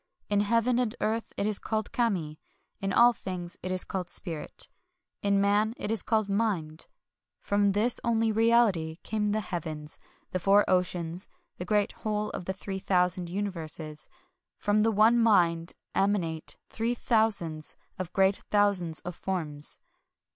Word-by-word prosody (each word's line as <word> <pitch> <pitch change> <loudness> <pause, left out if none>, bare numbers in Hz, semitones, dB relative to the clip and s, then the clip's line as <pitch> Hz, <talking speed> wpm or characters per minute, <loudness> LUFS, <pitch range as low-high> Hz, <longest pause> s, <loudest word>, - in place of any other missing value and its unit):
In 205 -1 +2
Heaven 230 +3 +2
and 240 -2 0
Earth 225 +1 -1
it 200 - 0
is 210 -1 +1
called 220 -1 -2
Kami; 180 -11 -1 0.4
in 195 -1 -2
all 240 +4 +6
things 180 -4 -6
it 185 - -4
is 185 0 +2
called 185 -2 -4
Spirit; 165 -6 -4 0.5
in 200 -1 +2
Man 205 +3 +2
it 210 - -3
is 225 -4 0
called 220 -2 +1
Mind.... 195 -7 -1 0.5
From 205 -1 +2
this 225 +4 +1
only 225 -1 +2
reality 220 -8 +3
came 210 -1 -1
the 215 +1 +1
heavens, 155 -5 -5 0.3
the 185 - -1
four 200 +3 +4
oceans, 180 -1 0 0.3
the 180 - -4
great 205 +1 +2
whole 210 -1 -3
of 180 - -6
the 190 - -2
three 195 0 -5
thousand 180 -2 +1
universes; 165 -5 -4 0.2
— - - -57
from 205 +1 +3
the 225 - +3
One 220 +3 +5
Mind 170 -7 +3 0.2
emanate 180 -6 0
three 230 +2 -1
thousands 205 -11 +1 0.2
of 185 -2 -4
great 195 0 +3
thousands 200 -6 +3
of 180 0 -6
forms." 155 -7 -3
200 Hz, 155 wpm, -28 LUFS, 175-215 Hz, 0.5 s, all